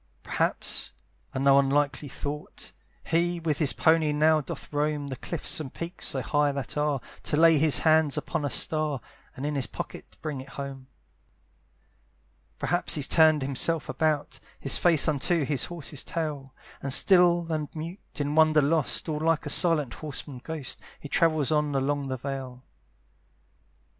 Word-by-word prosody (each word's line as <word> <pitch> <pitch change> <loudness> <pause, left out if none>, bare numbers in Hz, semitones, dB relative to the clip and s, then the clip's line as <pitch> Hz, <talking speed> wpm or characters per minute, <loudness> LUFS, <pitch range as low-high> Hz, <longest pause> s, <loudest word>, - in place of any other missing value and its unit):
Perhaps, - - 0 0.4
and 130 - -3
no 140 0 +6
unlikely 140 +1 +1
thought! 145 +3 -6 0.3
He 175 +1 0
with 160 -3 -1
his 150 -4 +3
pony 160 -1 +3
now 155 +1 +3
doth 145 - -8
roam 145 -1 -1
The 130 - -4
cliffs 165 +6 -3
and 140 -4 -6
peaks 170 +2 -6
so 130 -2 -2
high 145 0 +2
that 140 -3 -5
are, 150 -2 0 0.2
To 150 - -1
lay 165 -1 +6
his 155 -1 +5
hands 155 -2 +4
upon - - -2
a 145 - 0
star, 155 0 0 0.4
And 135 - -5
in 150 - -1
his 135 -3 -1
pocket - - -8
bring 150 -4 -4
it 135 - -12
home. 135 -2 -6 1.7
Perhaps 175 +1 0
he's 145 -3 -1
turned 155 -3 +4
himself 140 +3 +1
about, 155 -2 -1 0.2
His 135 - +1
face 165 -5 +4
unto 155 +1 +1
his 145 -1 0
horse's 155 -5 -5
tail, 150 -5 -4 0.3
And 140 - -3
still 175 +1 +4
and 155 -2 -2
mute, 165 +5 -6 0.2
in 145 0 -2
wonder 155 -1 +5
lost, 155 +3 +1
All 155 -2 -2
like 160 0 +1
a - - 0
silent 155 -8 +3
horseman 145 -3 -5
ghost, 155 -5 -5 0.2
He 145 - -9
travels 155 -4 +2
on 150 -2 +1
along 140 +1 0
the 130 -1 -3
vale. 130 -1 -6
150 Hz, 160 wpm, -27 LUFS, 140-160 Hz, 1.7 s, no